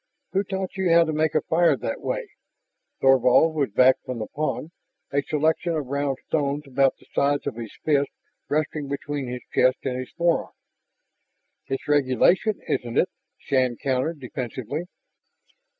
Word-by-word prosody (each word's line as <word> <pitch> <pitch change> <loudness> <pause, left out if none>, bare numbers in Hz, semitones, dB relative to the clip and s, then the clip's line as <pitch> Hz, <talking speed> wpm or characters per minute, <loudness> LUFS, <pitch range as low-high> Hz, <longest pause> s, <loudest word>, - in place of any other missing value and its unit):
"Who 195 +1 +1
taught 190 -1 -4
you 190 -3 +1
how 170 0 +7
to 160 -1 -2
make 155 0 +1
a 155 - +4
fire 165 -3 +3
that - - -4
way?" - - -3 0.7
Thorvald 135 +4 +5
was 145 -5 0
back 130 +5 +5
from 125 - -5
the 110 - -3
pond, 155 +3 -3 0.4
a 140 - +2
selection 160 +4 0
of 150 -3 -2
round 140 0 -1
stones 145 -1 -1
about 135 0 +2
the - - -22
size 145 0 +1
of - - -2
his 115 -2 -7
fist 145 -2 +2 0.4
resting 150 -1 -1
between 140 -1 -4
his 125 0 -5
chest 130 +1 +4
and 130 -1 -2
his 130 - -6
forearm. 170 -1 +1 1.1
"It's 135 - -4
regulation, 145 - +3
isn't 120 -1 -2
it?" 185 - +3 0.3
Shann 130 -4 0
countered 135 +4 -1
defensively. 130 +4 -5
140 Hz, 155 wpm, -24 LUFS, 130-160 Hz, 1.1 s, how